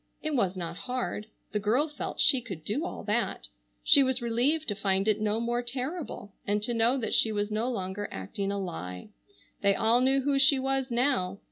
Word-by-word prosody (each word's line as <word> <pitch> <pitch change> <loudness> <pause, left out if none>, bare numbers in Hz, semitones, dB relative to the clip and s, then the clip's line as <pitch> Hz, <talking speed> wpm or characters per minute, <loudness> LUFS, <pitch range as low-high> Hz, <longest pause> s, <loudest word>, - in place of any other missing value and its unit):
It 310 0 -2
was 195 -8 +1
not 170 -1 -5
hard. 245 -4 -2 0.2
The 210 - 0
girl 235 +9 +2
felt 295 - -6
she 270 -3 +5
could 190 -10 -8
do 265 +10 -1
all - - -6
that. - - -1 0.4
She 295 -2 +7
was 260 -1 +2
relieved 250 +7 0
to 205 - 0
find 195 0 +1
it 215 0 +2
no 215 +1 +1
more 240 +1 0
terrible, 255 - -5
and 205 +1 +1
to 240 +2 0
know 230 +3 +3
that 235 - -2
she 220 - +4
was 205 0 -2
no 220 +4 0
longer 195 -3 -3
acting 195 - -4
a 200 - -2
lie. 90 - -6 0.5
They 200 -1 +3
all 230 +3 +3
knew 270 +1 +4
who 275 0 +1
she 275 0 +5
was 270 0 0
now. 235 -7 +1
230 Hz, 205 wpm, -29 LUFS, 200-265 Hz, 0.5 s, She